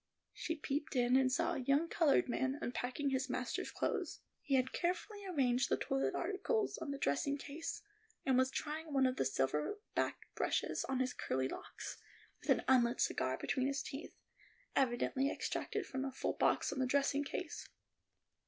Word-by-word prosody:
She 325 - -2
peeped 295 -1 -3
in, 245 0 +4
and 260 -1 +5
saw 330 +6 +2
a - - -2
young 280 +5 +3
colored 320 -4 +4
man 260 +2 0
unpacking 255 +1 -2
his 265 0 0
master's 250 -1 -2
clothes. - - -2 0.2
He 275 - +1
had 260 0 +2
carefully 385 +4 -1
arranged 255 -8 +2
the - - +3
toilet 135 0 0
articles 410 +4 0
on - - -4
the 280 - -2
dressing 275 - +1
case, 290 +3 -5 0.4
and 265 - +4
was 260 +1 +4
trying 305 +2 -4
one 270 -1 +4
of 255 0 +1
the - - +1
silver 135 - 0 0.2
backed - - -1
brushes - - 0
on 265 -1 0
his 255 -1 0
curly 130 0 -1
locks, - - -7 0.4
with - - -13
an - - +4
unlit 245 -2 +4
cigar 130 0 +1
between 260 0 0
his 275 0 -1
teeth, 285 +2 -7 0.6
evidently 265 +1 +2
extracted - - -2
from 265 0 -3
a 270 - -2
full 260 - -1
box - - +2
on 275 - -4
the 260 - +2
dressing 280 +1 +2
case. 310 +3 -5
270 Hz, 175 wpm, -36 LUFS, 250-290 Hz, 0.6 s, and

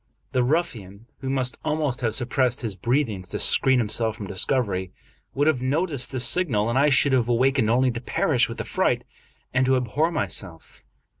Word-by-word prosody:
The 125 - +1
ruffian, 115 - -2
who 135 - -5
must 130 -2 0
almost 150 -5 -1
have 110 -2 0
suppressed 125 0 0
his 115 -4 -3
breathings 110 -3 -1
to - - -4
screen 130 -1 +4
himself 110 -1 0
from 105 - -6
discovery, 95 -2 0 0.4
would 145 +2 +1
have 155 -5 +1
noticed 140 0 -1
this 130 -2 -1
signal, 120 - 0
and 130 - +1
I 145 +2 +4
should 140 0 +4
have 120 -2 +1
awakened 125 -1 +2
only 125 +2 +2
to 120 0 -6
perish - - +1
with - - -7
affright, - - 0 0.5
and 130 0 +2
to 130 - +3
abhor 135 +7 0
myself. 95 - -4
125 Hz, 175 wpm, -24 LUFS, 110-135 Hz, 0.5 s, screen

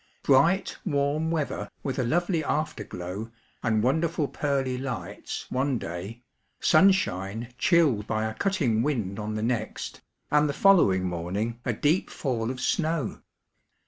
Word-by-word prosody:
Bright, 165 +8 +3
warm 145 -1 0
weather, 160 -3 -2
with 135 -1 -2
a - - +2
lovely 170 +5 +1
after 150 -7 -1
glow 95 +5 -6 0.3
and 110 -2 +1
wonderful 160 +3 +1
pearly 135 -3 -1
lights 125 -4 -5
one 130 0 +1
day, 100 +7 -6 0.4
sunshine 120 - +2
chilled 145 - +3
by 110 0 0
a 110 - -2
cutting 140 - +1
wind 110 -8 -1
on 105 0 -3
the 110 - -2
next, 115 -2 -3 0.3
and 150 0 +4
the - - -1
following 150 - +5
morning 95 +7 -2
a 120 - +1
deep 150 - +1
fall 120 -5 -2
of 130 0 -4
snow. 160 -1 -1
130 Hz, 140 wpm, -27 LUFS, 110-155 Hz, 0.4 s, following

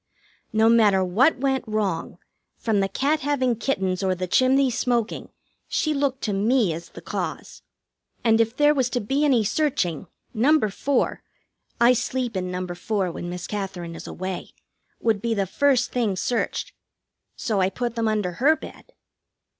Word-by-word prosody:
No 220 +1 +3
matter 215 -5 +5
what 245 - +3
went 265 0 0
wrong, 205 -6 -2 0.4
from 220 -3 0
the 195 0 +1
cat 285 +9 +1
having 265 -5 +1
kittens 190 -7 -1
or 190 -1 +1
the 185 0 -3
chimney 260 +6 +3
smoking, 235 -1 -1 0.4
she 310 - 0
looked 275 -2 -1
to 210 - -1
me 210 -1 +2
as 170 +2 -8
the - - -12
cause. - - -5 0.6
And 225 -1 +4
if 230 +3 -1
there 295 0 +5
was 260 -4 +1
to 245 - -1
be 270 +7 0
any 260 -7 +4
searching, 200 - -1 0.3
No. 280 +8 +4
4 235 +6 0 0.6
I 240 +1 +6
sleep 250 -1 -2
in 185 -1 -2
No. 180 0 -3
4 180 +1 -2
when 175 - -6
Miss 180 0 -5
Katherine 190 -5 -5
is - - -9
away 185 0 -6 0.4
would 220 -3 +1
be 230 0 0
the 200 -2 0
first 255 +5 +2
thing 230 -6 0
searched. 235 +5 -2 0.6
So 210 -4 -1
I 185 - +3
put 240 +3 -3
them 230 -1 -1
under 210 -4 0
her 275 - +3
bed. - - -12
225 Hz, 165 wpm, -24 LUFS, 190-260 Hz, 0.6 s, I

